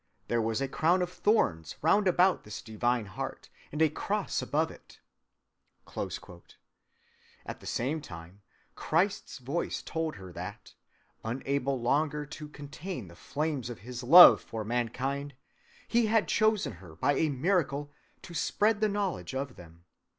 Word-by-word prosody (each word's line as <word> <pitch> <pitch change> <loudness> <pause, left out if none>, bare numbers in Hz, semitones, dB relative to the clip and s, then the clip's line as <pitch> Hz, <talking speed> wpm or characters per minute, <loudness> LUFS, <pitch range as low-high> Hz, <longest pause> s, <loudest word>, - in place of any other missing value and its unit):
There 120 -1 +2
was 110 +1 -1
a 135 - 0
crown 170 +6 +2
of 180 - -4
thorns 85 - +1
round 200 +5 +4
about 180 +1 +3
this 105 - -8
divine 120 +1 0
Heart, 95 - -6 0.2
and 150 +2 +1
a 160 - +5
cross 205 +5 -2
above 160 +2 0
it." - - -16 2.5
At - - -6
the - - -11
same 145 +6 -1
time 90 - -11 0.3
Christ's 180 +6 0
voice 140 +6 -3
told 160 -1 -3
her 95 -2 -10
that, - - -8 0.5
unable 135 +3 -1
longer 150 +4 +1
to 150 +1 -8
contain 145 - -7
the 85 - -14
flames 145 - -3
of 120 - -8
his 125 +3 -7
love 170 +8 +10
for 110 -1 -5
mankind, 130 +5 -2 0.5
he 235 -1 +3
had 220 0 +3
chosen 215 - +2
her 85 -4 -12
by 145 - +2
a 155 +3 +1
miracle 145 -1 0 0.3
to 175 - -10
spread 210 +5 +1
the 215 - +3
knowledge 195 - -2
of 135 -1 -3
them. 85 0 -15
140 Hz, 145 wpm, -30 LUFS, 120-175 Hz, 2.5 s, love